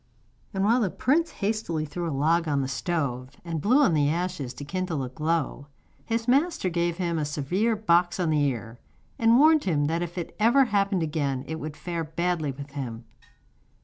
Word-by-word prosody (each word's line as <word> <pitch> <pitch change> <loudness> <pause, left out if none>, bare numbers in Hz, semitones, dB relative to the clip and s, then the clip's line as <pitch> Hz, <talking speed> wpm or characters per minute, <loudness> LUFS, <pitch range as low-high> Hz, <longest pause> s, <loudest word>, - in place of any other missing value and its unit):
And 195 0 -1
while 230 +5 +4
the 205 - +1
prince 320 - +1
hastily 200 -7 -2
threw 170 +3 -4
a - - -3
log 160 +4 +2
on 140 -2 +1
the - - -2
stove 135 -3 -3
and 165 -2 -3
blew 255 - +4
on 190 - +3
the 145 -2 +3
ashes 170 -5 -2
to 145 - -7
kindle 175 -3 -2
a 125 - -4
glow, 155 0 -2 0.4
his 230 0 -2
master 275 - +2
gave 170 0 0
him 170 -3 -1
a - - 0
severe 175 +10 0
box 175 -4 +2
on 170 -3 +1
the 150 -1 +2
ear, 120 -3 -3 0.4
and 230 +1 +5
warned 310 +2 +5
him 150 -6 +1
that 165 +3 0
if 175 +1 -5 0.2
ever 235 +6 +5
it 255 - +2
happened 200 -3 +1
again 140 -4 -2
it 160 0 -4
would 155 -1 -6
fare 170 -2 -3
badly 160 -1 -1
with 140 +1 -9
him. 120 -5 -6
170 Hz, 195 wpm, -26 LUFS, 145-195 Hz, 0.4 s, and